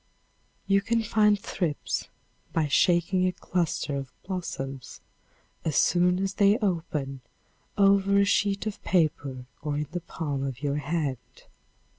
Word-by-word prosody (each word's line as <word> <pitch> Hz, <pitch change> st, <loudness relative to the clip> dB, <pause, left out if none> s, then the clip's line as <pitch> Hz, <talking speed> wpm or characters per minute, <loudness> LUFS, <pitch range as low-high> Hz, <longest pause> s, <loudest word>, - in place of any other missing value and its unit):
You 195 Hz, 0 st, +3 dB
can 230 Hz, +2 st, 0 dB
find 210 Hz, -1 st, +3 dB
thrips 170 Hz, -6 st, -2 dB, 0.5 s
by 160 Hz, -2 st, +1 dB
shaking 175 Hz, +5 st, +3 dB
a -, -, +1 dB
cluster 170 Hz, -5 st, -2 dB
of 135 Hz, -2 st, -6 dB
blossoms, 140 Hz, -, -5 dB, 0.6 s
as 155 Hz, -3 st, -1 dB
soon 180 Hz, 0 st, +4 dB
as 195 Hz, +1 st, -1 dB
they 200 Hz, +1 st, +4 dB
open, 155 Hz, -, -2 dB, 0.6 s
over 200 Hz, 0 st, +4 dB
a 200 Hz, -, +5 dB
sheet 200 Hz, 0 st, +1 dB
of 215 Hz, -2 st, -4 dB
paper 145 Hz, -7 st, 0 dB, 0.2 s
or 145 Hz, -1 st, -2 dB
in 150 Hz, 0 st, -2 dB
the 175 Hz, 0 st, -3 dB
palm 145 Hz, -5 st, -4 dB
of 135 Hz, 0 st, -5 dB
your 145 Hz, 0 st, 0 dB
hand. 150 Hz, -3 st, -3 dB
175 Hz, 135 wpm, -27 LUFS, 145-195 Hz, 0.6 s, a